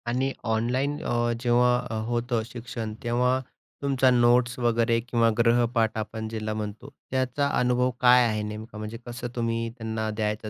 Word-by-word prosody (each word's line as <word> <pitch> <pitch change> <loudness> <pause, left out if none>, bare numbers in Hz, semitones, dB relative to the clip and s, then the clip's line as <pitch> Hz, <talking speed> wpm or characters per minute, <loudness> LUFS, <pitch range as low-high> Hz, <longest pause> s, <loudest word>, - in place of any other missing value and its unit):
आणि 130 +3 0 0.2
ऑनलाईन 125 +6 0
अ, 120 0 0
जेव्हा 125 -1 +2
होतं 120 0 0
शिक्षण, 115 -2 -6
तेव्हा 125 +2 +2 0.4
तुमच्या 135 -2 +3
नोट्स 120 0 +3
वगैरे 115 -1 +2
किंवा 115 -1 +1
गृहपाठ 115 -1 +2
आपण 110 0 -4
ज्याला 110 -1 -3
म्हणतो 110 +4 -6 0.2
त्याचा 130 +2 0
अनुभव 125 0 +2
काय 125 0 +7
आहे 110 -1 -1
नेमका? 105 +1 -7
म्हणजे 110 +2 -6
कसं 120 0 -5
तुम्ही 115 -1 -1
त्यांना 110 -1 -3
द्यायचं 105 0 -2
120 Hz, 145 wpm, -26 LUFS, 110-125 Hz, 0.4 s, काय